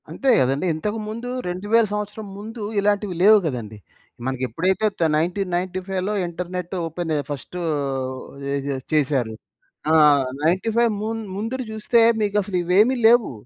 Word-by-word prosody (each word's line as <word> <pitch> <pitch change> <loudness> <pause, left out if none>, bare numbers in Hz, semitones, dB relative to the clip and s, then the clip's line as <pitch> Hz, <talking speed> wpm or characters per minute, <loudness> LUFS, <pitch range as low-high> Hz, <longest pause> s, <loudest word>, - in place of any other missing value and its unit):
అంతే 275 - -1
గదండీ. 135 +6 +1
ఇంతకు 210 +8 -3
ముందు 230 +3 -5 0.2
2000 205 +6 +2
సంవత్సరం 210 +1 -4
ముందు 220 +3 -8 0.2
ఇలాంటివి 205 -2 0
లేవు 215 +2 +8
గదండీ. 115 -7 -4 0.5
మనకెప్పుడైతే 130 - 0
తే 165 - +3
1995లో 185 +2 -2
ఇంటర్నెట్టు 180 +1 -5
ఓపెనె 165 -1 -2
ఫస్టు 145 +5 -6 0.9
ఏజె 140 0 -2 0.2
చేశారు. 135 -6 +1 0.6
ఆహ్, 150 -4 +6 0.2
95 220 +8 +2
మున్ 225 +1 -3
ముందుర 225 +6 -3
జూస్తే 220 +2 +2 0.2
మీకసలు 205 -2 0
ఇవేమి 205 +9 +4
లేవు. 235 0 +5
185 Hz, 115 wpm, -22 LUFS, 160-215 Hz, 0.9 s, లేవు